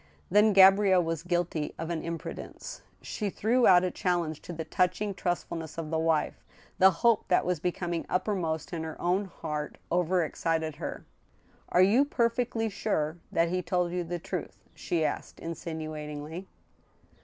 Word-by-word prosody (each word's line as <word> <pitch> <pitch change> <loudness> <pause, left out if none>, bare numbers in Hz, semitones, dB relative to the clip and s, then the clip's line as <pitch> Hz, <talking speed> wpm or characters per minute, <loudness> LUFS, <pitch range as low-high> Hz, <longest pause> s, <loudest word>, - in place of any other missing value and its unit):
Then 210 +2 +6
Gabrielle 195 -1 +6
was 165 -2 -2
guilty 175 -3 -1
of 165 +1 -4
an 165 -2 -2
imprudence. 165 -1 -6 0.2
She 210 -2 -3
threw 235 +6 +2
out 180 -1 +7
a 180 - 0
challenge 170 -4 -1
to - - -8
the 160 -1 -5
touching 185 +4 0
trustfulness 170 -3 -3
of 165 -1 -4
the 160 - +1
wife. 160 -1 0 0.4
The 190 - +8 0.2
hope 230 -3 +4
that 180 - +3
was 180 -2 0
becoming 175 0 -2
uppermost 180 -4 -1
in 165 - -2
her 160 -1 -6
own 185 +4 +1
heart 150 -4 -5
overexcited 165 -3 0
her. - - -6 0.3
" - - -32
Are 180 - +5
you 220 +9 +5
perfectly 235 -3 0
sure 175 -6 -1
that 165 0 +2
he 180 +1 0
told 180 0 0
you 180 0 -1
the 175 +1 -4
truth? - - -5
" - - -34
she 165 -2 +1
asked, - - -4
insinuatingly. 155 0 -6
175 Hz, 160 wpm, -29 LUFS, 160-190 Hz, 0.4 s, The